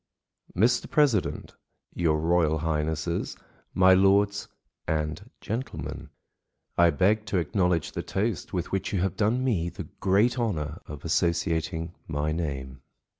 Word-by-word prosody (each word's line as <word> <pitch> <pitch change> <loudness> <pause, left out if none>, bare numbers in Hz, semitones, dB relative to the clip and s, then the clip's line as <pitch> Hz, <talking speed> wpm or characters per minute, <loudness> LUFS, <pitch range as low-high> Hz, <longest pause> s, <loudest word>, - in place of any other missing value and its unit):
] - - -29
MR. 120 +6 +3
PRESIDENT, 135 -11 +1 0.4
your 80 -3 +1
Royal 80 -1 +2
Highnesses, 80 +1 -2 0.4
my 95 0 +6
Lords 100 +2 +3 0.4
and 80 +7 -2
Gentlemen,—I 110 -6 -3
beg 105 +5 +2
to 95 - 0
acknowledge 90 0 +1
the - - -3
toast 105 +3 -2
with 90 -3 -3
which 95 - -1
you 95 - +1
have 95 -1 0
done 115 +5 +1
me 95 -10 0
the - - -8
great 105 +7 +3
honour 85 -7 -2
of 75 +1 -9
associating 80 0 0
my 75 0 -1
name. 70 -5 -4
85 Hz, 125 wpm, -27 LUFS, 80-100 Hz, 0.4 s, my